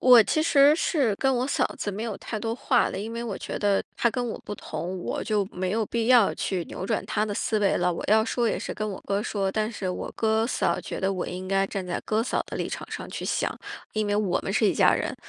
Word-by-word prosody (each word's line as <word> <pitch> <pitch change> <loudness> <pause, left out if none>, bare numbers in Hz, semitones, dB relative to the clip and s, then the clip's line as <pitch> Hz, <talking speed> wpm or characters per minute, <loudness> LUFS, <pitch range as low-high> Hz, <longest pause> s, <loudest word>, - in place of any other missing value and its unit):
我 250 -3 +8
其 310 +8 +1
实 290 -2 +6
是 275 - +1
跟 265 +3 +2
我 250 +1 0
嫂 280 - 0 0.2
子 205 - -2
没 205 +3 -4
有 225 -4 -3
太 220 - -5
多 225 0 -2
话 250 0 +2
的， - - -4
因 220 +3 -5
为 235 - -4
我 220 -5 -4
觉 - - -5
得 200 -1 +2 0.2
她 235 - +3
跟 245 +1 -2
我 - - -4
不 205 - -4
同， 185 -1 -5
我 - - -3
就 210 -2 +1
没 185 0 -2
有 220 0 +1
必 230 +1 -1
要 245 -5 +5
去 180 -3 -2
扭 185 - -6
转 220 - -1
她 210 - 0
的 205 -1 -3
思 215 - 0
维 205 -2 +2
了， 180 - +1
我 - - -5
要 220 +1 +5
说 235 0 0
也 - - -1
是 - - -4
跟 215 0 -3
我 195 - -6
哥 200 +1 0
说， 195 -3 -1
但 215 +2 0
是 195 -4 -4
我 180 - -4
哥 220 0 +2
嫂 175 -8 0
觉 - - -6
得 190 +1 0
我 185 - -3
应 185 +1 -5
该 195 0 +2
站 195 -1 -4
在 175 - -2
哥 220 +1 +1
嫂 245 - -1
的 - - -6
立 - - -2
场 - - -6
上 - - -5
去 - - -5
想， - - 0 0.4
因 215 -1 0
为 205 - +1
我 205 -4 +1
们 - - -4
是 215 +1 +3
一 - - +3
家 - - +5
人。 - - -2
215 Hz, 295 characters per minute, -26 LUFS, 195-230 Hz, 0.4 s, 我